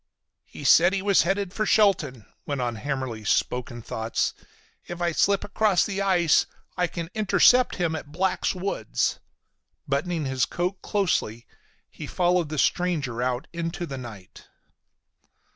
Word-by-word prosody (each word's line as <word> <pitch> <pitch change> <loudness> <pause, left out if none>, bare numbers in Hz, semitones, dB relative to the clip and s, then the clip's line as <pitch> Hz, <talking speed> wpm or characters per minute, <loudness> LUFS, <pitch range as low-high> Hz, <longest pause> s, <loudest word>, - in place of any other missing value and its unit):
"He - - -11
said 175 +6 +6
he 195 -1 -1
was 200 -1 +4
headed 195 +2 -1
for 215 - -1
Shelton," 165 - +2 0.2
went 140 -2 -2
on 120 -2 -2
Hammersly's 125 -4 -4
spoken 120 -1 -1
thoughts. 110 -1 -2 0.5
"If 175 0 -6
I 175 -1 +1
slip 200 +4 +2
across 205 -2 +2
the 200 -1 -3
ice 180 -5 +3 0.3
I 180 -1 +1
can 170 0 -6
intercept 230 +4 +4
him 170 -3 -1
at 145 -2 -7
Black's 185 +3 0
woods." 180 - -1 0.7
Buttoning 155 +3 -1
his 130 -1 +1
coat 180 +2 -3
closely, 160 - -1 0.4
he - - -9
followed 175 -3 +1
the 155 - -4
stranger 145 -8 0
out 125 0 -1
into 170 +1 -3
the 135 -5 -6
night. 110 -7 -11
170 Hz, 145 wpm, -25 LUFS, 130-190 Hz, 0.7 s, said